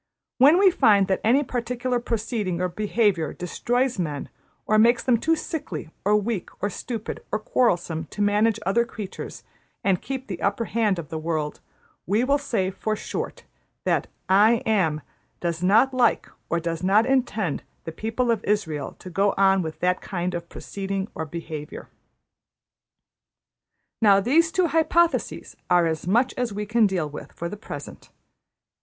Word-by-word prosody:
When 285 Hz, +6 st, +7 dB
we 385 Hz, 0 st, +6 dB
find 205 Hz, -, +4 dB
that 190 Hz, -, +1 dB
any 255 Hz, +6 st, +4 dB
particular 245 Hz, 0 st, -2 dB
proceeding 220 Hz, -6 st, -2 dB
or 180 Hz, 0 st, 0 dB
behaviour 205 Hz, -3 st, 0 dB
destroys 245 Hz, +7 st, -1 dB
men, 150 Hz, -5 st, -3 dB, 0.4 s
or 215 Hz, 0 st, +3 dB
makes 235 Hz, +2 st, +4 dB
them 240 Hz, -3 st, +3 dB
too 325 Hz, +6 st, +2 dB
sickly 275 Hz, -, -5 dB
or 210 Hz, +2 st, +3 dB
weak 210 Hz, -2 st, -1 dB
or 205 Hz, -, -1 dB
stupid 225 Hz, +2 st, -5 dB
or -, -, +1 dB
quarrelsome 175 Hz, -8 st, 0 dB
to 205 Hz, -, -13 dB
manage 210 Hz, +2 st, +2 dB
other 215 Hz, +5 st, +3 dB
creatures 215 Hz, -4 st, -8 dB, 0.4 s
and 190 Hz, -3 st, +2 dB
keep 265 Hz, -1 st, -5 dB
the 185 Hz, -7 st, -6 dB
upper 200 Hz, +4 st, 0 dB
hand 215 Hz, -4 st, +1 dB
of 165 Hz, -4 st, -6 dB
the 160 Hz, -, -4 dB
world, 155 Hz, -2 st, -2 dB, 0.5 s
we 210 Hz, +6 st, +2 dB
will 280 Hz, +3 st, +2 dB
say, 195 Hz, -9 st, -1 dB
for 215 Hz, +3 st, -2 dB
short, -, -, -5 dB, 0.4 s
that -, -, +1 dB, 0.2 s
`I 215 Hz, +6 st, +4 dB
Am' 180 Hz, -9 st, +1 dB, 0.4 s
does 170 Hz, -1 st, -2 dB
not 225 Hz, +9 st, +4 dB
like 255 Hz, -1 st, +2 dB, 0.2 s
or 170 Hz, -, +1 dB
does 165 Hz, -1 st, -3 dB
not 200 Hz, +4 st, +4 dB
intend 240 Hz, -, 0 dB, 0.2 s
the 165 Hz, -, -5 dB
people 225 Hz, +7 st, -1 dB
of 225 Hz, -3 st, 0 dB
Israël 160 Hz, -10 st, -2 dB
to 185 Hz, -, -10 dB
go 195 Hz, +3 st, +2 dB
on 195 Hz, -1 st, +4 dB
with 160 Hz, -2 st, -6 dB
that 180 Hz, 0 st, +1 dB
kind 180 Hz, -2 st, -3 dB
of 170 Hz, -1 st, -5 dB
proceeding 195 Hz, 0 st, -4 dB
or 160 Hz, -, -4 dB
behaviour. 155 Hz, -2 st, -7 dB, 2.1 s
``Now 200 Hz, -2 st, +6 dB
these 320 Hz, +8 st, +3 dB
two 370 Hz, 0 st, +2 dB
hypotheses 330 Hz, +2 st, +1 dB
are 175 Hz, -1 st, +5 dB
as 160 Hz, 0 st, -2 dB
much 235 Hz, +7 st, +2 dB
as 245 Hz, -2 st, -1 dB
we 210 Hz, +1 st, -4 dB
can 220 Hz, +1 st, +3 dB
deal 180 Hz, -5 st, -1 dB
with 150 Hz, -, -9 dB
for 170 Hz, -, -5 dB
the 180 Hz, -, -6 dB
present. 210 Hz, -, -9 dB
205 Hz, 160 wpm, -24 LUFS, 180-235 Hz, 2.1 s, When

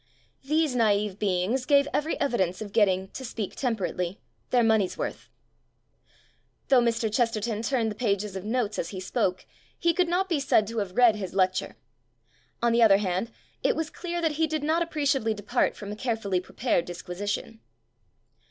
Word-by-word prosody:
These 305 Hz, -1 st, +1 dB
naive 210 Hz, -3 st, +1 dB
beings 200 Hz, +5 st, 0 dB
gave 280 Hz, -1 st, +5 dB
every 310 Hz, +2 st, 0 dB
evi 275 Hz, -4 st, -1 dB
dence 185 Hz, -1 st, 0 dB
of 210 Hz, -2 st, -6 dB
getting, 190 Hz, -3 st, +2 dB
to 265 Hz, -, -8 dB
speak 230 Hz, -4 st, -5 dB
temperately, 190 Hz, -, -2 dB, 0.3 s
their 245 Hz, -2 st, +3 dB
money's 220 Hz, -4 st, +2 dB
worth. -, -, -5 dB, 1.4 s
Though 260 Hz, -3 st, +6 dB
Mr. 230 Hz, -2 st, 0 dB
Chesterton 225 Hz, -2 st, 0 dB
turned 230 Hz, -2 st, 0 dB
the -, -, -6 dB
pages 205 Hz, -3 st, -1 dB
of 190 Hz, -, -5 dB
notes 220 Hz, -1 st, -1 dB
as -, -, -2 dB
he 190 Hz, -, -6 dB
spoke, 185 Hz, 0 st, -1 dB, 0.3 s
he 340 Hz, -1 st, +2 dB
could 360 Hz, +1 st, +2 dB
not 360 Hz, +3 st, +1 dB
be 335 Hz, -5 st, 0 dB
said 265 Hz, -6 st, +3 dB
to 230 Hz, -1 st, -2 dB
have 200 Hz, 0 st, -4 dB
read 240 Hz, -3 st, +6 dB
his 190 Hz, -2 st, -6 dB
lecture. 185 Hz, -1 st, +1 dB, 0.9 s
On 235 Hz, -, +4 dB
the 235 Hz, -, +3 dB
other 210 Hz, -4 st, +7 dB
hand, 195 Hz, +2 st, -1 dB, 0.3 s
it -, -, +2 dB
was 320 Hz, 0 st, -3 dB
clear 345 Hz, -1 st, -4 dB
that 325 Hz, -, +2 dB
he 320 Hz, -, +4 dB
did 310 Hz, -1 st, -2 dB
not 320 Hz, +3 st, +2 dB
appreciably 280 Hz, -9 st, 0 dB
depart 210 Hz, +5 st, 0 dB
from 205 Hz, -1 st, -7 dB
a -, -, -4 dB
carefully 220 Hz, -5 st, -1 dB
prepared 185 Hz, -2 st, -1 dB
disquisition. 195 Hz, +5 st, -5 dB
225 Hz, 175 wpm, -27 LUFS, 200-265 Hz, 1.4 s, other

